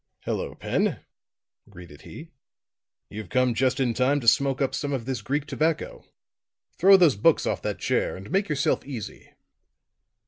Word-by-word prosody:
"Hello, -, -, -4 dB
Pen," -, -, -1 dB, 0.7 s
greeted 85 Hz, -6 st, -13 dB
he. 160 Hz, +1 st, -11 dB, 0.8 s
"You've 105 Hz, -3 st, -8 dB
come 130 Hz, +1 st, +2 dB
just 130 Hz, +2 st, 0 dB
in 125 Hz, -3 st, +1 dB
time 130 Hz, +4 st, +1 dB
to 115 Hz, -, -7 dB
smoke 135 Hz, +3 st, +3 dB
up 135 Hz, -, 0 dB
some 145 Hz, -1 st, -3 dB
of 125 Hz, -4 st, -3 dB
this 130 Hz, -4 st, -3 dB
Greek 140 Hz, +7 st, -2 dB
tobacco. 160 Hz, +1 st, -2 dB, 0.8 s
Throw 195 Hz, +3 st, +7 dB
those 170 Hz, -8 st, +4 dB
books 145 Hz, +11 st, +3 dB
off -, -, -2 dB
that -, -, -3 dB
chair -, -, -1 dB
and 95 Hz, +2 st, -11 dB
make 195 Hz, 0 st, 0 dB
yourself 145 Hz, -2 st, 0 dB
easy." 125 Hz, -7 st, -8 dB
135 Hz, 160 wpm, -25 LUFS, 115-150 Hz, 0.8 s, Throw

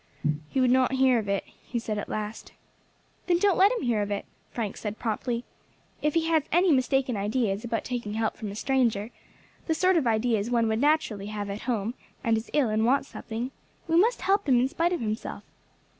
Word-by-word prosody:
"He 270 Hz, -, -1 dB
would 255 Hz, -1 st, +4 dB
not 260 Hz, 0 st, +3 dB
hear 260 Hz, -2 st, +4 dB
of 205 Hz, -2 st, -5 dB
it," 200 Hz, 0 st, 0 dB
he 240 Hz, -, -8 dB
said 220 Hz, -2 st, -2 dB
at -, -, -6 dB
last. 215 Hz, +1 st, -5 dB, 0.7 s
"Then 350 Hz, -1 st, +4 dB
don't 390 Hz, 0 st, +3 dB
let 390 Hz, +3 st, +5 dB
him -, -, -2 dB
hear 235 Hz, -4 st, +1 dB
of 205 Hz, -, -2 dB
it," 205 Hz, -1 st, -3 dB, 0.2 s
Frank 220 Hz, -4 st, -3 dB
said 210 Hz, 0 st, -5 dB
promptly. 235 Hz, +1 st, -2 dB, 0.6 s
"If 300 Hz, +1 st, 0 dB
he 330 Hz, -1 st, +2 dB
has 325 Hz, -1 st, +3 dB
any 350 Hz, +2 st, +4 dB
mistaken 260 Hz, -2 st, +2 dB
ideas 210 Hz, 0 st, 0 dB
about 230 Hz, -1 st, -2 dB
taking 235 Hz, -4 st, -4 dB
help 220 Hz, 0 st, 0 dB
from 215 Hz, -, -6 dB
a 200 Hz, -, -7 dB
stranger, 235 Hz, -3 st, +1 dB, 0.6 s
the 320 Hz, -, +1 dB
sort 370 Hz, +1 st, +3 dB
of 285 Hz, -7 st, +1 dB
ideas 220 Hz, -1 st, +1 dB
one 235 Hz, -2 st, +2 dB
would 220 Hz, +2 st, 0 dB
naturally 280 Hz, -9 st, +1 dB
have 205 Hz, -1 st, -4 dB
at 200 Hz, -, -5 dB
home, 225 Hz, -1 st, 0 dB, 0.3 s
and 230 Hz, -3 st, +3 dB
is 220 Hz, +1 st, -4 dB
ill 280 Hz, -6 st, +2 dB
and 215 Hz, +1 st, +1 dB
wants 270 Hz, +4 st, +2 dB
something, 235 Hz, +3 st, -5 dB, 0.4 s
we 330 Hz, -, +1 dB
must 455 Hz, +8 st, +3 dB
help 395 Hz, -5 st, +2 dB
him 250 Hz, -2 st, +5 dB
in 250 Hz, -, +3 dB
spite 335 Hz, +5 st, 0 dB
of 350 Hz, -, -1 dB
himself. 215 Hz, 0 st, -4 dB
240 Hz, 210 wpm, -27 LUFS, 215-280 Hz, 0.7 s, let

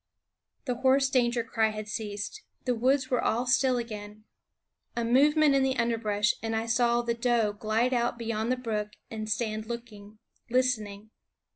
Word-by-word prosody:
The 250 Hz, -3 st, -2 dB
hoarse 270 Hz, +1 st, +3 dB
danger 240 Hz, -2 st, +2 dB
cry 225 Hz, -1 st, +1 dB
had 215 Hz, 0 st, -6 dB
ceased; 210 Hz, -, -5 dB, 0.2 s
the 250 Hz, -, +2 dB
woods 260 Hz, +3 st, +1 dB
were 250 Hz, -, +1 dB
all 240 Hz, +3 st, +1 dB
still 255 Hz, 0 st, +3 dB
again. 215 Hz, -2 st, -7 dB, 0.7 s
A 235 Hz, -, 0 dB
movement 290 Hz, +5 st, +4 dB
in 275 Hz, -, +3 dB
the 265 Hz, 0 st, +1 dB
underbrush, 220 Hz, -3 st, +1 dB
and 225 Hz, 0 st, -2 dB
I 220 Hz, +1 st, -1 dB
saw 240 Hz, 0 st, +2 dB
the 235 Hz, 0 st, 0 dB
doe 235 Hz, -3 st, +1 dB
glide 220 Hz, +4 st, 0 dB
out 240 Hz, -1 st, 0 dB
beyond 230 Hz, 0 st, -2 dB
the 255 Hz, -, +1 dB
brook 210 Hz, -4 st, -3 dB, 0.2 s
and 215 Hz, -1 st, -5 dB
stand 215 Hz, 0 st, -2 dB
looking, 220 Hz, -3 st, -8 dB, 0.3 s
listening. 220 Hz, -4 st, -1 dB
235 Hz, 160 wpm, -28 LUFS, 215-250 Hz, 0.7 s, movement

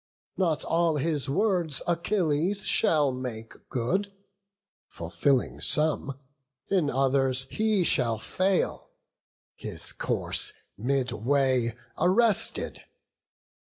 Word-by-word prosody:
Not 170 Hz, -5 st, 0 dB
all 165 Hz, -1 st, +1 dB
his 150 Hz, -1 st, -1 dB
words 175 Hz, -3 st, 0 dB
Achilles 175 Hz, +1 st, 0 dB
shall 150 Hz, -4 st, +3 dB
make 125 Hz, -3 st, -7 dB, 0.2 s
good; 190 Hz, -, -1 dB, 0.8 s
Fulfilling 85 Hz, +11 st, -1 dB
some, 150 Hz, -3 st, +2 dB, 0.5 s
in 180 Hz, -7 st, +2 dB
others 135 Hz, -1 st, +2 dB
he 215 Hz, -3 st, +1 dB
shall 120 Hz, -8 st, +2 dB
fail, 185 Hz, -, -1 dB, 0.6 s
His -, -, 0 dB
course -, -, 0 dB, 0.2 s
midway 125 Hz, 0 st, 0 dB, 0.2 s
arrested. 205 Hz, +4 st, +2 dB
145 Hz, 85 wpm, -27 LUFS, 130-180 Hz, 0.8 s, shall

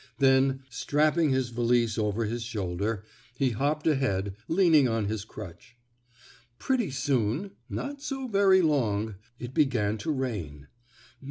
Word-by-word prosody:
Then, 135 Hz, 0 st, +3 dB
strapping 150 Hz, +5 st, +2 dB
his 130 Hz, -2 st, +1 dB
valise 120 Hz, -1 st, +1 dB
over 110 Hz, 0 st, 0 dB
his 115 Hz, +3 st, -3 dB
shoulder, 105 Hz, -2 st, -3 dB, 0.3 s
he 130 Hz, -2 st, +2 dB
hopped 145 Hz, +6 st, -1 dB
ahead, 100 Hz, -11 st, 0 dB
leaning 165 Hz, -6 st, +4 dB
on 115 Hz, -3 st, 0 dB
his 105 Hz, 0 st, -3 dB
crutch. 110 Hz, +2 st, -11 dB, 0.8 s
Pretty 250 Hz, -7 st, 0 dB
soon, 130 Hz, -, -1 dB, 0.2 s
not 280 Hz, 0 st, -5 dB
so 270 Hz, -2 st, -4 dB
very 195 Hz, -4 st, +4 dB
long, 110 Hz, -9 st, +1 dB, 0.2 s
it 120 Hz, 0 st, -7 dB
began 110 Hz, -8 st, +1 dB
to 130 Hz, -, -4 dB
rain. 100 Hz, -, -3 dB
125 Hz, 125 wpm, -28 LUFS, 110-150 Hz, 0.8 s, leaning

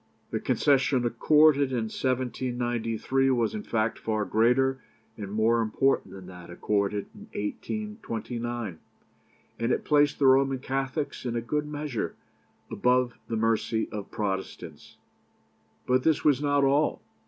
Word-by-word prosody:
The -, -, -1 dB
concession 135 Hz, -3 st, +2 dB
accorded 145 Hz, +4 st, +4 dB
in 125 Hz, -3 st, -1 dB
1793 125 Hz, +1 st, -1 dB
was, 120 Hz, -3 st, +1 dB
in 215 Hz, -, -4 dB
fact, 110 Hz, -, -1 dB
far 110 Hz, -1 st, -1 dB
greater 130 Hz, +4 st, +2 dB, 0.3 s
and 100 Hz, -3 st, -7 dB
more 110 Hz, +2 st, +2 dB
important 115 Hz, -1 st, +1 dB
than 95 Hz, -1 st, -10 dB
that 90 Hz, -1 st, -11 dB
accorded 100 Hz, +3 st, -1 dB
in -, -, -14 dB, 0.2 s
1829, 120 Hz, -, -4 dB, 0.8 s
and 115 Hz, +2 st, 0 dB
it -, -, -1 dB
placed 145 Hz, -1 st, +3 dB
the 140 Hz, -, +1 dB
Roman 135 Hz, 0 st, +4 dB
Catholics, 135 Hz, +3 st, -3 dB
in 120 Hz, -2 st, -3 dB
a -, -, +1 dB
great 150 Hz, +5 st, -2 dB
measure, 150 Hz, -5 st, -4 dB, 0.6 s
above 125 Hz, -1 st, +1 dB
the 115 Hz, -, -2 dB
mercy 110 Hz, 0 st, 0 dB
of 105 Hz, -2 st, -6 dB
Protestants. 95 Hz, -2 st, -5 dB, 0.9 s
But 130 Hz, 0 st, +2 dB
this 160 Hz, +2 st, +2 dB
was 145 Hz, -3 st, +4 dB
not 145 Hz, -1 st, +2 dB
all. 140 Hz, +3 st, +2 dB
125 Hz, 130 wpm, -27 LUFS, 110-135 Hz, 0.9 s, accorded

